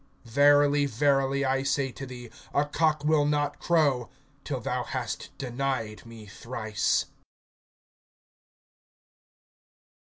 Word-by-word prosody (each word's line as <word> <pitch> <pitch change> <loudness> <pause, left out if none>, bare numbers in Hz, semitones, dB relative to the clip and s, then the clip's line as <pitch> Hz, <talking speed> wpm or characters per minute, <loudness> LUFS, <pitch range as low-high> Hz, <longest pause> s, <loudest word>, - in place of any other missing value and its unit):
Verily, 145 +3 +4
verily, 135 +2 +1
I 135 0 +1
say 135 -1 0
to 135 +2 -8
thee, 120 -2 -9 0.2
a 145 - +3
cock 150 0 0
will 155 -1 +4
not 145 0 0
crow, 145 -8 +2 0.3
till 135 -3 -3
thou 125 +1 -2
hast 125 -4 -4
denied 125 -4 -3
me 115 -2 -11
thrice. 110 0 -1
135 Hz, 100 wpm, -27 LUFS, 120-145 Hz, 0.3 s, Verily